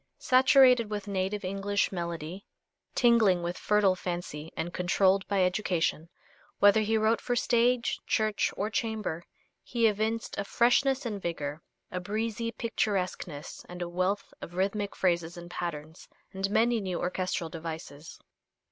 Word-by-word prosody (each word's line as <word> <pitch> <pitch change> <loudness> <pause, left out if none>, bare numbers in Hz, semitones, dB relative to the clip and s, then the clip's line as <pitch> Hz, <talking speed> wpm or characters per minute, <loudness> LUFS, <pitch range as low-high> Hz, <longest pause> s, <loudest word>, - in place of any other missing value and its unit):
Saturated 255 -3 +5
with 205 -1 -4
native 195 0 -2
English 195 +1 0
melody, 170 0 -5 0.5
tingling 220 -7 +4
with 175 +1 -2
fertile 205 -2 +2
fancy 175 -4 -5
and 175 +2 -3
controlled 190 +2 +2
by 195 -2 +2
education, 180 -4 0 0.5
whether 205 +2 +6
he 220 +1 +1
wrote 220 +1 +2
for 245 - -1
stage, 240 0 +2
church, 215 -2 +1
or 210 +3 -1
chamber, 215 -8 -2 0.4
he 235 -1 0
evinced 220 +2 0
a - - 0
freshness 255 +5 +2
and 210 -4 -3
vigor, 155 -3 -4 0.3
a 180 - -2
breezy 220 +4 -2
picturesqueness 185 -10 -3
and 180 0 -5
a - - -4
wealth 185 +3 -1
of 175 - -9
rhythmic 200 +2 -1
phrases 170 -2 0
and 175 0 -9
patterns, 160 -2 -6 0.3
and 195 +1 -2
many 230 +2 +2
new 185 -3 -3
orchestral 180 -2 -2
devices. 160 -2 -7
195 Hz, 140 wpm, -29 LUFS, 175-220 Hz, 0.5 s, whether